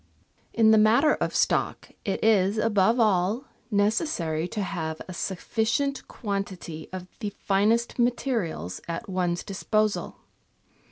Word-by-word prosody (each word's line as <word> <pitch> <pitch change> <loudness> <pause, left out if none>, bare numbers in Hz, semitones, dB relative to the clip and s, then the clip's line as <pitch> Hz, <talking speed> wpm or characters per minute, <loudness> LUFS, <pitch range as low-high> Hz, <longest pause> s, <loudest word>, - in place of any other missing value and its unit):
In 220 -1 +5
the 220 - +6
matter 235 +8 +5
of - - -2
stock - - 0
it 195 - -2
is, 205 -2 +3
above 220 +1 +3
all, 210 +2 +2 0.3
necessary 205 - 0
to 205 +2 -3
have 160 -4 -4
a 185 - -7
sufficient 225 - -1
quantity 195 -7 -5
of 185 -1 -6
the 210 - -2
finest 210 +5 +1
materials 235 - -1
at 170 +7 -4
one's 180 -2 -1
disposal. 215 +2 -1
205 Hz, 120 wpm, -26 LUFS, 185-225 Hz, 0.3 s, the